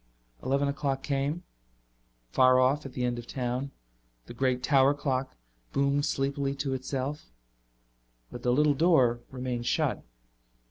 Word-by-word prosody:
Eleven 140 +2 +1
o'clock 140 -1 -2
came. 140 +5 -1 0.9
Far 130 - +5
off, 135 +3 +2
at 135 - -12
the 125 - -3
end 120 -1 -1
of 120 - -10
town, 125 +1 -3 0.6
the - - -9
great 125 0 0
tower 140 0 +4
clock 135 -2 -2 0.4
boomed 140 +1 +2
sleepily 140 0 -1
to 140 -1 -2
itself. 130 - -4 1.0
But 120 - -8
the 125 - +1
little 150 +3 +4
door 135 -7 +3
remained 125 -2 -4
shut. - - +1
135 Hz, 135 wpm, -28 LUFS, 130-140 Hz, 1.0 s, Far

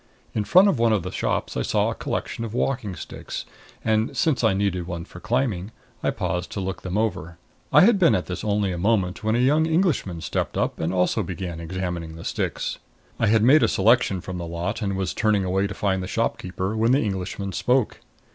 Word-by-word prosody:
In 105 - -1
front 185 - +6
of 170 -11 +2
one 115 -1 +4
of 100 -5 +1
the 90 - -5
shops - - -2
I - - 0
saw - - +1
a - - -2
collection 115 - -4
of 115 0 -5
walking 120 -7 -1
sticks 75 - -7 0.4
and, 110 +1 +1
since 155 -8 +2
I 110 -4 +4
needed 95 -3 -1
one 85 -1 -5
for 90 - -12
climbing, 105 -3 -1 0.3
I - - +1
paused 90 0 -2
to - - -3
look 95 0 -4
them 95 +2 -3
over. 85 -7 -2 0.3
I - - +7
had 210 +1 +5
been 170 -4 +5
at 90 - -1
this 90 - -5
only 105 -2 +1
a 90 - -4
moment 100 -1 +1
when 110 +1 +1
a - - +2
young 150 +5 +3
Englishman 160 - 0
stepped - - -2
up - - -1
and 80 +2 -1
also 90 +4 +1
began 90 -2 -5
examining 85 -1 -4
the 80 - -9
sticks. - - -2 0.4
I 115 - +2
had 110 0 +4
made 140 +6 +6
a 115 - +4
selection 105 -3 +3
from 90 -1 -6
the 85 - -5
lot 90 +7 -3
and 100 -2 -1
was 95 -2 -1
turning 105 -3 +1
away 95 +2 +1
to 100 - -6
find 95 -2 0
the 90 - -4
shopkeeper, 95 +3 -2
when 115 +3 +3
the 140 - +4
Englishman 95 -1 -3
spoke. 125 +4 +1
100 Hz, 220 wpm, -24 LUFS, 90-115 Hz, 0.4 s, I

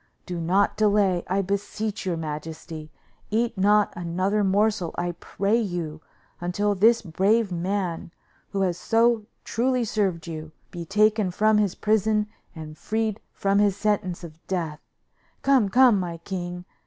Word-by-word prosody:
Do 175 -1 -4
not 190 +5 +2
delay, 200 -4 +3
I 195 +2 +1
beseech 200 +1 -3
your 175 -2 0
majesty. 155 0 -6 0.4
Eat 230 +2 0
not 205 +2 +3
another 185 +4 0
morsel, 200 -2 +1
I 175 0 -1
pray 200 +4 0
you, 175 -8 -3 0.4
until 205 +4 0
this 225 +4 +4
brave 200 +4 +2
man, 180 -1 -2 0.4
who 195 - -2
has 180 -2 0
so 230 0 +2 0.2
truly 250 +1 0
served 195 -6 -1
you, 155 -2 -7 0.2
be 170 -1 -6
taken 210 +1 +3
from 215 +4 +3
his 200 -4 +1
prison 215 0 +2 0.3
and 155 -1 -8
freed 220 +1 -1
from 200 0 +1
his 200 -2 +3
sentence 200 -4 -1
of 165 -1 -11
death. 165 -5 -2 0.6
Come, 265 -7 +4
come, 245 -2 +5
my 175 -2 -4
king! 180 0 -5
195 Hz, 140 wpm, -25 LUFS, 175-215 Hz, 0.6 s, come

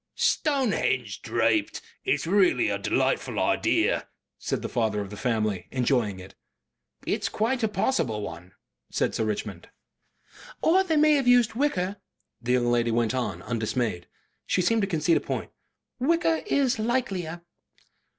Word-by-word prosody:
"Stonehenge 275 -7 0
draped! 325 0 +1 0.3
It's 390 - +1
really 185 -8 +3
a 100 - -1
delightful 100 - 0
idea;" - - +1 0.3
said - - -3
the - - -2
father 110 -3 0
of 100 -1 -5
the - - -6
family, 110 -4 -1
enjoying 120 -6 0
it. 95 +1 -12 0.7
"It's - - -1
quite 245 +4 0
a 220 - +2
possible 190 - 0
one," 90 +1 -8 0.4
said - - 0
Sir - - -1
Richmond. 105 -4 -4 0.9
"Or 370 +4 +5
they 325 -5 0
may 305 0 +5
have 275 -4 +1
used 245 -3 +5
wicker," 205 -7 0 0.4
the 125 +1 0
young 120 -1 +2
lady 120 -1 +2
went 115 0 +1
on, 130 -2 -3
undismayed. 115 -5 -2 0.4
She 180 - +1
seemed 225 +5 +2
to 195 - 0
concede 165 -2 +2
a - - -2
point. - - -4 0.5
"Wicker 330 +4 +2
IS 265 - +1
likelier." 195 -8 -2
170 Hz, 145 wpm, -26 LUFS, -, 0.9 s, Or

